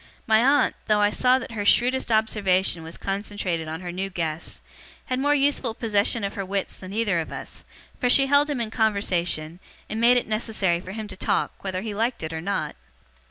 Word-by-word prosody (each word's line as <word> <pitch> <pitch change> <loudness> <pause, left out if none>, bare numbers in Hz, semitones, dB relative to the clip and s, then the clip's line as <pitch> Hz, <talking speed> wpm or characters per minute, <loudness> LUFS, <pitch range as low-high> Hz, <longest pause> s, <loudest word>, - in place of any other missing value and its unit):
My 220 -1 +4
aunt, 280 +3 +3
though 210 -1 +3
I 205 0 +3
saw 250 +3 +4
that 260 - -6
her 215 -3 -3
shrewdest 245 +4 +3
observation 195 -5 +2
was 160 +1 -8
concentrated 195 -4 -3
on 160 +2 -5
her 175 -1 -5
new 190 +2 -3
guest, 165 -3 -3 0.5
had 255 -2 -2
more 290 +2 +3
useful 275 -5 +1
possession 215 0 +1
of 200 - -2
her 195 - -3
wits 195 0 -3
than 185 0 -10
either 205 -4 +1
of 160 - -4
us; - - -8 0.4
for 245 - +1
she 275 +2 +6
held 285 +2 +3
him 285 -4 -1
in 225 -2 -3
conversation, 180 -7 0 0.3
and 220 +1 -3
made 245 +1 +6
it 245 - 0
necessary 215 -5 0
for 185 +2 -9
him 215 0 -5
to - - -7
talk, - - 0
whether 185 -1 -3
he 215 0 -4
liked 230 -1 -1
it 160 +1 -4
or 160 - -4
not. 200 +4 -2
205 Hz, 205 wpm, -24 LUFS, 185-235 Hz, 0.5 s, she